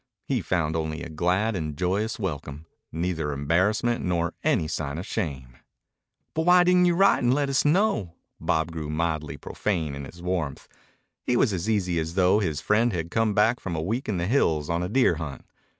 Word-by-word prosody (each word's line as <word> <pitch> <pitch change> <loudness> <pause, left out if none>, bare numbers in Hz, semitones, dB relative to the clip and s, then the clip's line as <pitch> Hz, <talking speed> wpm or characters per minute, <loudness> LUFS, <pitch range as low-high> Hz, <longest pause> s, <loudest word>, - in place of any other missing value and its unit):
He 130 -5 0
found 85 -4 -1
only 80 0 -3
a 85 - -7
glad 90 +7 0
and 75 -4 -4
joyous 95 +5 -1
welcome, 75 -6 -5 0.3
neither 80 -2 -2
embarrassment 95 - +1
nor 85 -1 0
any 125 - +2
sign 75 -1 -3
of 90 - -5
shame. 65 - -4 0.8
"But 160 +2 -1
why 180 0 +7
didn't 180 0 +4
you 175 -1 +3
write 195 +2 +4
and 120 -1 +3
let 140 +1 +1
us 135 - +2
know?" 145 - +2 0.2
Bob 80 +1 0
grew 80 -2 -5
mildly 75 -2 -2
profane 80 0 -2
in 70 0 -6
his 85 +6 -12
warmth. 85 -6 -3 0.5
He 125 - 0
was 115 -5 +3
as 90 +3 -2
easy 90 -6 +1
as 80 +2 -4
though 95 +2 +4
his 80 -8 -2
friend 110 +6 +2
had 85 -3 -4
come 110 -2 +1
back 110 +3 +3
from 90 -3 -4
a - - -2
week 115 +9 -2
in 100 - 0
the 85 - -1
hills 85 - +1
on 85 +1 0
a 90 - -2
deer 130 +4 +3
hunt. 75 -5 -6
90 Hz, 200 wpm, -26 LUFS, 80-110 Hz, 0.8 s, why